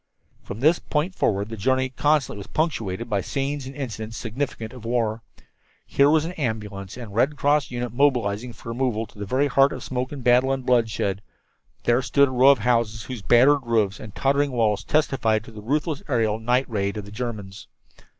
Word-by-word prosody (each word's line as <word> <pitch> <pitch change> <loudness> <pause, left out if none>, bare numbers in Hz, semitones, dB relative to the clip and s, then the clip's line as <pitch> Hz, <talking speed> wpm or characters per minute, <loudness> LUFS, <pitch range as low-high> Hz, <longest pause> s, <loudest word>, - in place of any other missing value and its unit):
From 105 - -8
this 160 +5 +4
point 155 +5 -2
forward 100 - 0
the 115 - -5
journey 130 +5 +1
constantly 145 -4 +1
was 100 - -9
punctuated 115 - -2
by 105 -4 0
scenes 135 +5 -3
and 135 - -9
incidents 115 -5 -5
significant 115 -1 -4
of 125 -4 -11
war. 115 -1 -1 0.6
Here 140 +1 +3
was 155 0 +3
an 170 - -4
ambulance 105 - -4
and 115 -5 -8
Red 135 +7 +1
Cross 145 -2 +2
unit 120 -1 -4
mobilizing 125 -4 +1
for 115 - -11
removal 115 -2 -1
to 105 - -18
the 105 - -5
very 130 +6 +2
heart 140 -1 +4
of - - -6
smoke 125 0 -3
and 140 -3 -7
battle 125 +2 +4
and 135 -1 -2
bloodshed; 110 -5 +1 0.6
there 120 +2 +3
stood 140 +1 +3
a - - -6
row 130 +2 +5
of 140 - +6
houses 115 -1 0
whose 125 -4 -7
battered 130 +7 +5
roofs 110 -4 0
and 110 -3 -10
tottering 140 +1 +1
walls 110 -4 +1
testified 120 -8 +1
to 110 -1 -14
a 105 - -8
ruthless 145 +5 -1
aerial 110 -5 +1
night 125 +4 +1
raid 100 -2 -2
of 105 - -5
the 100 - -11
Germans. 105 -4 -6
120 Hz, 195 wpm, -24 LUFS, 110-135 Hz, 0.6 s, of